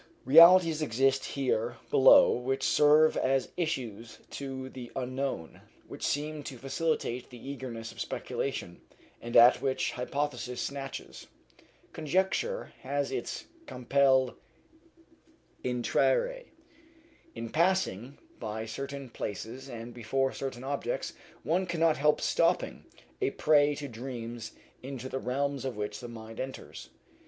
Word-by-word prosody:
Realities 165 Hz, +2 st, +8 dB
exist 135 Hz, 0 st, +2 dB
here 120 Hz, -4 st, -1 dB
below 135 Hz, 0 st, +7 dB
which 130 Hz, +2 st, -1 dB
serve 150 Hz, +1 st, +5 dB
as 135 Hz, 0 st, +1 dB
issues 120 Hz, -, -3 dB
to 135 Hz, -1 st, -5 dB
the 125 Hz, -2 st, -9 dB
unknown, 130 Hz, -9 st, -4 dB, 0.3 s
which -, -, -10 dB
seem 150 Hz, +1 st, -1 dB
to 130 Hz, -, -6 dB
facilitate 135 Hz, -2 st, -2 dB
the 125 Hz, +2 st, -8 dB
egress 115 Hz, -4 st, -7 dB
of -, -, -8 dB
speculation, 90 Hz, -10 st, -4 dB, 0.4 s
and 120 Hz, 0 st, 0 dB
at 120 Hz, +1 st, +8 dB
which 135 Hz, -1 st, 0 dB
hypothesis 125 Hz, -1 st, -3 dB
snatches. 135 Hz, -1 st, -6 dB, 0.7 s
Conjecture 190 Hz, -, -1 dB
has 140 Hz, +1 st, -2 dB
its 125 Hz, -2 st, -4 dB, 0.2 s
compelle 130 Hz, 0 st, +2 dB, 1.3 s
intrare. -, -, +1 dB, 0.9 s
In 115 Hz, 0 st, -6 dB
passing 155 Hz, -, +1 dB, 0.2 s
by 110 Hz, +1 st, -4 dB
certain 135 Hz, +4 st, -6 dB
places 120 Hz, +4 st, -6 dB
and 120 Hz, -1 st, -7 dB
before 135 Hz, +3 st, -1 dB
certain 130 Hz, -2 st, -5 dB
objects 145 Hz, -, -3 dB, 0.3 s
one 180 Hz, +3 st, 0 dB
cannot 165 Hz, -2 st, +2 dB
help 150 Hz, +2 st, +3 dB
stopping -, -, +1 dB, 0.4 s
a -, -, +2 dB
prey 150 Hz, -1 st, +3 dB
to 145 Hz, 0 st, -5 dB
dreams 120 Hz, -2 st, -7 dB, 0.3 s
into 130 Hz, -1 st, -6 dB
the 130 Hz, -, -3 dB
realms 140 Hz, +2 st, -1 dB
of 130 Hz, -4 st, -4 dB
which 105 Hz, 0 st, -4 dB
the 120 Hz, -, -7 dB
mind 115 Hz, -1 st, -10 dB
enters. 130 Hz, 0 st, -7 dB
135 Hz, 120 wpm, -30 LUFS, 120-145 Hz, 1.3 s, Realities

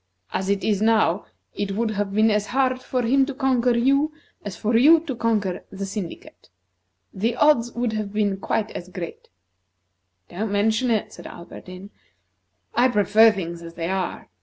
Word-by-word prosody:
As 190 Hz, +1 st, -2 dB
it 200 Hz, 0 st, 0 dB
is 205 Hz, -2 st, +1 dB
now, 215 Hz, -4 st, +2 dB, 0.3 s
it 200 Hz, -1 st, -3 dB
would 220 Hz, +2 st, -1 dB
have 205 Hz, -1 st, -2 dB
been 215 Hz, +2 st, +3 dB
as 210 Hz, 0 st, 0 dB
hard 255 Hz, 0 st, 0 dB
for 255 Hz, -1 st, -2 dB
him 270 Hz, +4 st, +3 dB
to 280 Hz, -, -5 dB
conquer 255 Hz, -3 st, +2 dB
you, 275 Hz, +5 st, +2 dB, 0.3 s
as 195 Hz, -4 st, -6 dB
for 225 Hz, +2 st, 0 dB
you 305 Hz, +8 st, +7 dB
to 300 Hz, -6 st, -5 dB
conquer 215 Hz, -5 st, -1 dB
the 195 Hz, 0 st, -5 dB
syndicate. 195 Hz, -3 st, -8 dB, 0.6 s
The 225 Hz, +5 st, -1 dB
odds 240 Hz, -4 st, +3 dB
would 240 Hz, -2 st, -1 dB
have 215 Hz, -2 st, -3 dB
been 205 Hz, -2 st, 0 dB
quite 220 Hz, +2 st, -2 dB
as 180 Hz, -, -8 dB
great." 180 Hz, -3 st, -8 dB, 1.0 s
"Don't 205 Hz, +4 st, -4 dB
mention 220 Hz, +5 st, +1 dB
it," 220 Hz, -3 st, -1 dB
said -, -, -10 dB
Alberdin. 185 Hz, +3 st, -11 dB, 0.8 s
"I 245 Hz, +2 st, +4 dB
prefer 220 Hz, 0 st, +5 dB
things 170 Hz, -4 st, -5 dB
as 170 Hz, 0 st, -10 dB
they 165 Hz, 0 st, -3 dB
are. 190 Hz, -2 st, -3 dB
215 Hz, 170 wpm, -23 LUFS, 195-240 Hz, 1.0 s, you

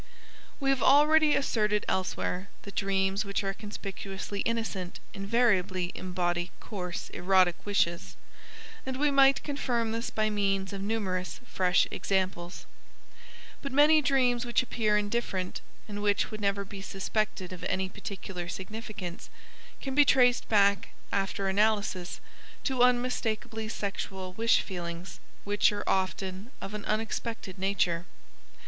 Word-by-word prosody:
We 275 Hz, -1 st, +2 dB
have 270 Hz, -, +1 dB
already 300 Hz, +2 st, +6 dB
asserted 210 Hz, -6 st, +1 dB
elsewhere 190 Hz, 0 st, -1 dB
that 200 Hz, -, -9 dB
dreams 195 Hz, 0 st, +1 dB
which 200 Hz, 0 st, -2 dB
are 195 Hz, 0 st, -1 dB
conspicuously 200 Hz, -1 st, -6 dB
innocent 220 Hz, -6 st, -2 dB
invariably 195 Hz, -4 st, +1 dB
embody 175 Hz, -1 st, -1 dB
coarse 180 Hz, -5 st, -5 dB
erotic 185 Hz, -1 st, +3 dB
wishes, 175 Hz, -4 st, 0 dB, 0.7 s
and 260 Hz, 0 st, -4 dB
we 295 Hz, +1 st, +3 dB
might 275 Hz, 0 st, +5 dB
confirm 245 Hz, -6 st, -1 dB
this 230 Hz, +1 st, -2 dB
by 215 Hz, 0 st, 0 dB
means 195 Hz, -1 st, 0 dB
of 195 Hz, -, -4 dB
numerous 195 Hz, -4 st, -2 dB
fresh 180 Hz, -4 st, +2 dB
examples. 185 Hz, -2 st, -2 dB, 1.0 s
But 275 Hz, -, -4 dB
many 300 Hz, +3 st, +6 dB
dreams 255 Hz, -3 st, +2 dB
which 245 Hz, +1 st, +2 dB
appear 215 Hz, -4 st, +1 dB
indifferent, 205 Hz, -3 st, -2 dB, 0.3 s
and 205 Hz, -1 st, -5 dB
which 205 Hz, -1 st, +1 dB
would 215 Hz, 0 st, -6 dB
never 200 Hz, 0 st, 0 dB
be 195 Hz, 0 st, -8 dB
suspected 195 Hz, -1 st, -2 dB
of 180 Hz, -, -9 dB
any 190 Hz, 0 st, 0 dB
particular 185 Hz, -2 st, -6 dB
significance, 200 Hz, -3 st, -6 dB, 0.5 s
can 270 Hz, -, -3 dB
be 290 Hz, +2 st, +7 dB
traced 250 Hz, -3 st, +4 dB
back, 200 Hz, -2 st, +4 dB, 0.2 s
after 195 Hz, 0 st, 0 dB
analysis, 205 Hz, -2 st, +1 dB, 0.4 s
to 260 Hz, -3 st, 0 dB
unmistakably 240 Hz, -3 st, +1 dB
sexual 195 Hz, -3 st, -4 dB
wish 230 Hz, +3 st, +3 dB
feelings, 175 Hz, -1 st, -6 dB, 0.2 s
which 205 Hz, +1 st, +3 dB
are 205 Hz, 0 st, -3 dB
often 190 Hz, +2 st, -1 dB
of 195 Hz, -, -6 dB
an 210 Hz, -1 st, -5 dB
unexpected 215 Hz, -2 st, -3 dB
nature. 180 Hz, -3 st, 0 dB
200 Hz, 130 wpm, -29 LUFS, 190-230 Hz, 1.0 s, be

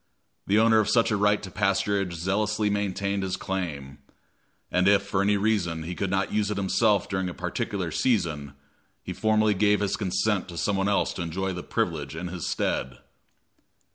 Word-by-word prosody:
The 100 Hz, -, +3 dB
owner 110 Hz, 0 st, +5 dB
of 110 Hz, -, +1 dB
such 115 Hz, -1 st, +3 dB
a -, -, +2 dB
right 105 Hz, 0 st, +2 dB
to 95 Hz, -, -7 dB
pasturage 100 Hz, -1 st, 0 dB
zealously 105 Hz, +4 st, 0 dB
maintained 100 Hz, -1 st, -1 dB
his 95 Hz, -1 st, -2 dB
claim; 75 Hz, -8 st, -4 dB, 0.7 s
and 90 Hz, +1 st, +2 dB
if, 100 Hz, 0 st, +5 dB
for 100 Hz, -1 st, -1 dB
any 100 Hz, +1 st, +2 dB
reason, 95 Hz, -6 st, 0 dB
he 85 Hz, +3 st, -5 dB
could 95 Hz, +2 st, -2 dB
not 95 Hz, +1 st, -1 dB
use 105 Hz, -1 st, +1 dB
it 105 Hz, -, -2 dB
himself 100 Hz, +1 st, +2 dB
during 95 Hz, -2 st, -2 dB
a 85 Hz, -, -8 dB
particular 90 Hz, 0 st, -3 dB
season, 80 Hz, -, 0 dB, 0.5 s
he -, -, -5 dB
formally 110 Hz, -1 st, +2 dB
gave 105 Hz, +1 st, +3 dB
his 100 Hz, -2 st, 0 dB
consent 95 Hz, 0 st, 0 dB
to 85 Hz, -, -8 dB
some 100 Hz, +6 st, 0 dB
one 95 Hz, 0 st, +1 dB
else 100 Hz, -, +1 dB
to -, -, -5 dB
enjoy 95 Hz, +3 st, -2 dB
the 90 Hz, -, -5 dB
privilege 75 Hz, -4 st, -2 dB
in 90 Hz, +2 st, -5 dB
his 85 Hz, -2 st, -4 dB
stead. 65 Hz, +1 st, -2 dB
95 Hz, 185 wpm, -26 LUFS, 90-105 Hz, 0.7 s, owner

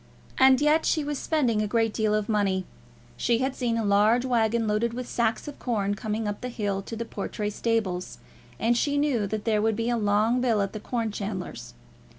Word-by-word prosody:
And 260 Hz, -1 st, +6 dB
yet 300 Hz, +2 st, +4 dB
she 310 Hz, -, +1 dB
was 290 Hz, -1 st, -3 dB
spending 250 Hz, -9 st, +1 dB
a 210 Hz, -, 0 dB
great 225 Hz, 0 st, +1 dB
deal 215 Hz, -1 st, +1 dB
of 210 Hz, -1 st, -1 dB
money. 195 Hz, -4 st, +1 dB, 0.5 s
She 235 Hz, -1 st, +2 dB
had 260 Hz, +2 st, -1 dB
seen 235 Hz, -3 st, -1 dB
a 225 Hz, -, -1 dB
large 210 Hz, +5 st, +3 dB
waggon 230 Hz, -2 st, +1 dB
loaded 215 Hz, +2 st, 0 dB
with 250 Hz, 0 st, -5 dB
sacks 230 Hz, +2 st, -1 dB
of 290 Hz, -, -8 dB
corn 205 Hz, -5 st, -1 dB
coming 215 Hz, +2 st, -3 dB
up 205 Hz, 0 st, -4 dB
the 250 Hz, -, -4 dB
hill 205 Hz, -4 st, -2 dB
to 225 Hz, -, -7 dB
the 230 Hz, +1 st, -4 dB
Portray 210 Hz, 0 st, -4 dB
stables, 205 Hz, -5 st, -2 dB, 0.4 s
and 235 Hz, +2 st, +2 dB
she 285 Hz, +4 st, +1 dB
knew 270 Hz, -8 st, +1 dB
that 215 Hz, +1 st, -4 dB
there 215 Hz, -2 st, +2 dB
would 220 Hz, 0 st, +1 dB
be 230 Hz, +2 st, -1 dB
a 240 Hz, -, +1 dB
long 215 Hz, +3 st, +2 dB
bill 235 Hz, -4 st, +2 dB
at 195 Hz, -, -4 dB
the 215 Hz, -, -5 dB
corn 225 Hz, 0 st, -2 dB
chandler's. 195 Hz, -, -6 dB
225 Hz, 210 wpm, -26 LUFS, 210-245 Hz, 0.5 s, And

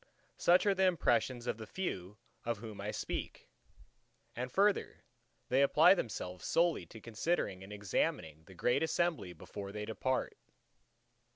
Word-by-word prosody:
Such 180 Hz, +3 st, +4 dB
are 200 Hz, -, +4 dB
the 190 Hz, 0 st, +2 dB
impressions 120 Hz, -8 st, +1 dB
of 115 Hz, -, -2 dB
the 110 Hz, -, -7 dB
few 105 Hz, -, -4 dB, 0.3 s
of 115 Hz, -1 st, -1 dB
whom 105 Hz, -2 st, -8 dB
I 105 Hz, -, -3 dB
speak. -, -, -5 dB, 0.8 s
And 125 Hz, +1 st, -4 dB
further, 200 Hz, +5 st, +1 dB, 0.5 s
they 130 Hz, +2 st, +4 dB
apply 155 Hz, +6 st, +7 dB
themselves 90 Hz, -, -4 dB
solely 165 Hz, -, +2 dB
to 110 Hz, -, -11 dB
considering 110 Hz, -, -2 dB
and 95 Hz, -, -11 dB
examining 80 Hz, -6 st, -2 dB
the 95 Hz, -, -14 dB
great 120 Hz, +7 st, +2 dB
assembly 160 Hz, -, 0 dB
before 100 Hz, +4 st, -8 dB
they 105 Hz, +1 st, -5 dB
depart. 130 Hz, +4 st, -1 dB
115 Hz, 145 wpm, -34 LUFS, 100-165 Hz, 0.8 s, apply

